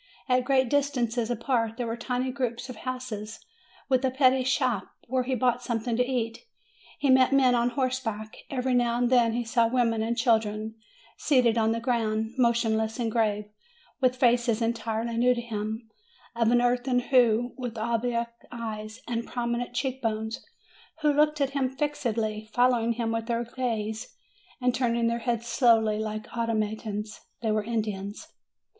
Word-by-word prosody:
At 250 -1 +2
great 260 -1 +3
distances 245 -4 0
apart 235 -1 0
there 245 - -2
were 230 0 -2
tiny 250 +2 -2
groups 250 -1 -3
of 255 - -6
houses 220 -4 -6 0.4
with 260 -1 +2
a 260 - +3
petty 260 0 +3
shop, 250 -6 +1 0.2
where 255 +1 0
he 255 +1 -1
bought 245 0 +1
something 235 -1 -2
to 250 - +3
eat. 240 -3 -2 0.6
He 280 -2 +2
met 260 0 +5
men 265 -2 +5
on 240 0 +2
horse 255 0 0
back; 220 -3 -5
every 260 -1 -1
now 240 -1 +2
and 245 0 +1
then 235 -3 +4
he 240 0 -1
saw 230 0 +3
women 230 -2 +1
and 230 +2 -1
children 220 -2 +1 0.4
seated 250 -6 +3
on 225 -1 +2
the 230 - 0
ground, 225 -2 -1
motionless 225 -3 +1
and 235 -3 -1
grave, 210 -2 +1 0.5
with 255 -2 +3
faces 240 -2 +3
entirely 230 0 -2
new 250 +1 +4
to - - -3
him, 220 0 -4 0.5
of 230 -1 +2
an 240 0 +4
earthen 245 +1 +2
hue, 245 -2 +3
with 245 -3 -5
oblique 235 +1 0 0.3
eyes 220 -1 -6
and 235 -1 -2
prominent 240 0 -3
cheek 265 0 -2
bones, 220 +1 -2 0.6
who 300 -1 +3
looked 300 +1 +3
at 275 -1 +1
him 275 -2 0
fixedly, 230 -6 -2
following 245 -1 +3
him 230 -1 -2
with 225 0 -2
their 235 0 0
gaze, 230 -2 -3 0.4
and 250 -1 +1
turning 235 -1 +1
their 235 0 +1
heads 235 -1 -1
slowly 225 -3 +3
like 215 +1 -5
automatons. 215 -2 -2 0.2
They 220 - +1
were 215 0 +1
Indians. 210 -3 -4
235 Hz, 165 wpm, -27 LUFS, 225-250 Hz, 0.6 s, met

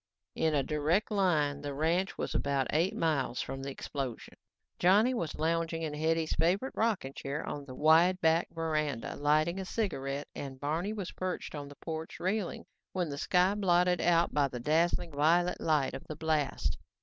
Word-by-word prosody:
In 160 -1 +1
a 140 - +2
direct 155 +9 0
line, 155 -8 +1
the 145 -1 -4
ranch 170 +6 +1
house - - -12
was - - -3
about 140 -1 0
eight 165 +5 +1
miles 140 -7 0
from 135 - -4
the 135 - -4
explosion. 135 -2 -5 0.5
Johnny 205 +8 +5
was 170 -11 -3
lounging 165 +1 0
in 155 -2 -3
Hetty's 160 +1 0
favorite 190 +11 +1
rocking 210 -12 0
chair 140 +3 -4
on 145 -1 -5
the 130 -2 -9
wide 165 +5 +5
back 165 0 +3
verandah, 155 -6 -2
lighting 155 +5 +2
a - - -3
cigarette 145 -9 -3
and 135 -2 -7
Barney 160 +8 -1
was 200 -4 -5
perched 185 -1 -4
on 145 -2 -6
the 145 - -12
porch 160 +2 -6
railing 190 0 -2 0.3
when 180 -4 -1
the 140 - -5
sky 180 +3 +3
was 205 - -3
blotted 180 -1 +3
out 170 -1 +3
by 145 -1 +3
the 125 -2 -6
dazzling 165 +5 +1
violet 170 +5 +2
light 150 -4 +1
of - - -6
the 155 - -5
blast. 155 -2 -1
160 Hz, 185 wpm, -31 LUFS, 145-175 Hz, 0.5 s, Johnny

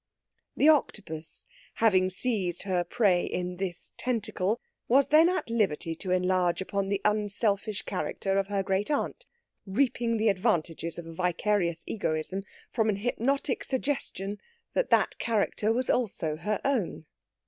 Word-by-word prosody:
'" - - -43
The 295 - +5
Octopus, 185 - +1 0.3
having 190 -5 +4
seized 185 -4 -1
her 185 -3 +1
prey 185 -1 +2
in 180 0 -3
this 180 -2 -4
tentacle, 225 -3 -1 0.3
was 270 +3 +4
then 315 +3 +7
at 370 - -1
liberty 195 -8 0
to 180 +3 -6
enlarge 180 -1 +2
upon 195 +1 -2
the 200 -1 0
unselfish 210 0 0
character 195 0 -1
of 195 - -1
her 200 -1 0
great 195 +1 0
aunt, 305 - -2 0.4
reaping 235 +1 +1
the 220 0 +3
advantages 170 -5 0
of 170 - -6
a 165 - -8
vicarious 180 0 0
egoism 185 -1 -2 0.3
from 220 -2 +1
an 210 - +2
hypnotic 245 +5 0
suggestion 255 -7 -2 0.3
that - - +1
that - - +3
character 220 -1 +1
was 250 +2 0
also 185 -10 0
her 210 +6 -2
own. 240 - 0
200 Hz, 145 wpm, -28 LUFS, 180-230 Hz, 0.4 s, then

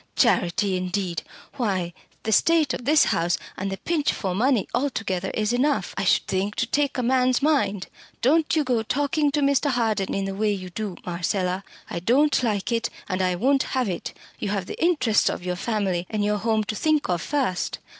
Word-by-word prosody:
Charity, 190 -1 +2
indeed! 180 -1 -2 0.4
Why, 190 -8 -1 0.3
the 220 - -1
state 310 +3 +3
of 245 - -5
this 305 +3 +5
house 170 +1 +1 0.2
and 195 +1 -3
the 195 - -3
pinch 320 - 0
for 190 -3 -3
money 235 +2 +2
altogether 220 -8 -1
is 215 +1 0
enough, 280 +4 +1
I - - -2
should - - +3
think, 195 +2 -1
to - - 0
take 285 +4 0
a 250 - 0
man's 255 +1 +2
mind. 210 -11 +1 0.3
Don't 310 +6 +3
you 310 - +3
go 250 -4 +1
talking 290 +5 0
to 295 +1 0
Mr. 280 +1 +2
Harden 225 -6 0
in 195 0 -1
the 195 - -3
way 210 +2 +1
you 185 -2 -6
do, 205 -1 -4
Marcella. 180 +2 -1 0.2
I - - -4
don't 265 - +3
like 215 -3 -1
it, 230 0 0 0.2
and 185 -1 -1
I 180 -1 +1
won't 265 +8 +2 0.2
have 255 -3 +1
it. 175 - -5 0.2
You 205 - -2
have 200 -2 -1
the - - -5
interests 255 -11 +3
of 175 - -5
your 180 0 -1
family 190 -4 -1
and 210 -2 -1
your 210 0 +1
home 220 0 +1
to 215 - -4
think 305 +4 +1
of 175 -2 0
first." 260 -12 -1
215 Hz, 200 wpm, -24 LUFS, 190-270 Hz, 0.4 s, this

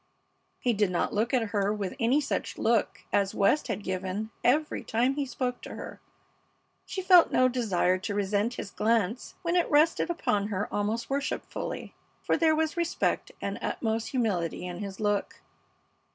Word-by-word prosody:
He 245 -2 +1
did 205 -2 +2
not 180 - -1
look 220 +3 +1
at 235 -5 +1
her 205 -1 +1
with 205 -3 -3
any 245 +5 +3
such 300 - -3
look - - +1
as 200 -1 +2
West 225 +10 +3
had 210 -3 -3
given 190 +3 -3
every 300 +5 +2
time 245 +4 +1
he 280 -1 -2
spoke 250 -1 -3
to - - -8
her. - - -8 0.9
She 380 - -4
felt 360 -2 +7
no 255 - +4
desire 195 -7 +1
to 195 +2 -3
resent 205 +4 0
his 195 - -6
glance 225 +1 0
when 340 0 0
it 350 - +2
rested 310 +3 +3
upon 210 -12 0
her 205 -1 -2
almost 220 +4 -1
worshipfully, 280 0 -3 0.3
for - - +2
there 320 -1 +3
was 315 0 0
respect 340 -1 0
and - - -3
utmost 225 -1 -1
humility 195 - -1
in 180 0 -5
his 195 -2 -6
look. 205 -2 -1
225 Hz, 165 wpm, -28 LUFS, 200-270 Hz, 0.9 s, felt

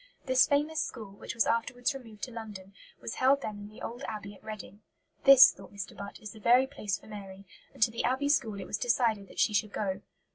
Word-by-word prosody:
This 260 -2 +4
famous 300 +2 +1
school, 215 -4 -6
which 200 - -8
was 230 - +3
afterwards 245 +4 0
removed 225 -6 -11
to 255 - -3
London, 210 -4 -9 0.3
was 230 - -5
held 275 +2 +4
then 210 -1 -5
in 205 0 -9
the 215 - -13
old 240 +3 -6
Abbey 205 -2 -6
at 200 - -18
Reading. 215 -1 -9 0.4
"This," 275 -1 +10
thought - - -14
Mr. 200 -1 -7
Butt, 200 0 -8
"is 215 -1 -8
the 220 - -13
very 245 +4 +5
place 210 -8 -3
for - - -19
Mary"; 195 -2 -10 0.3
and - - +1
to 225 - +3
the 230 - -3
Abbey 260 +4 +1
School 220 -8 +1
it 190 - -6
was 210 - -3
decided 230 -5 +1
that - - -16
she 215 - +3
should 205 0 +1
go. 195 -2 -2
220 Hz, 230 wpm, -30 LUFS, 205-250 Hz, 0.4 s, This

